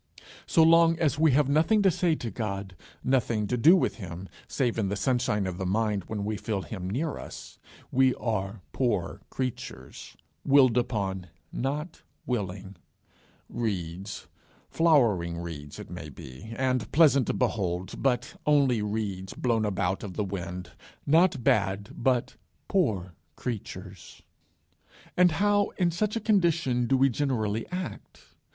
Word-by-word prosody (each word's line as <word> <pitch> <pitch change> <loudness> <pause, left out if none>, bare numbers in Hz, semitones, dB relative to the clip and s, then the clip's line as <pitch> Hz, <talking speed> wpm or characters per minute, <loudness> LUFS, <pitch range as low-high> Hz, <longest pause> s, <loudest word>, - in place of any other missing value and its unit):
So 165 - +5
long 165 0 +6
as 150 -4 +1
we 160 -3 +5
have 145 0 +3
nothing 165 +9 +3
to 190 - +5
say 170 -1 +1
to 120 -6 -5
God, 100 -3 -4 0.3
nothing 120 -4 +1
to 125 - -1
do 150 +10 +7
with 185 - 0
him, 90 -2 -8 0.2
save 120 -4 -1
in 100 -3 0
the 100 - -1
sunshine 120 -3 0
of 90 -1 -4
the 95 - -2
mind 105 -1 0
when 105 -2 -4
we 105 0 -2
feel 100 -4 -3
him 95 -3 -6
near 145 +9 -2
us, - - -10 0.3
we 130 -1 +4
are 105 -3 -3
poor 115 -9 -1
creatures, 130 -3 -6 0.3
willed 135 -4 +5
upon, 100 -7 -1 0.2
not 150 +6 -3 0.2
willing; 100 -5 -4 0.7
reeds, 95 -3 -4 0.5
flowering 115 - +3
reeds, 80 -4 -7
it - - -9
may 80 -4 -7
be, 70 - -11
and 130 -2 0
pleasant 140 -5 +5
to - - 0
behold, 95 -7 -2
but 125 -1 0
only 140 -6 +4
reeds 100 -3 -3
blown 115 -3 +1
about 95 -2 -1
of 95 -3 -7
the 105 - 0
wind; 90 -2 -5 0.3
not 160 -3 +3
bad, 100 -1 +1
but 125 -1 0 0.3
poor 105 - 0 0.2
creatures. 95 -6 -7 0.9
And 180 -2 +5
how 205 +2 +2
in 175 -2 +2
such 210 +6 -1
a - - 0
condition 170 - +2
do 135 - +3
we 135 +1 +4
generally 115 -5 -1
act? 180 +1 -6
115 Hz, 145 wpm, -27 LUFS, 95-140 Hz, 0.9 s, do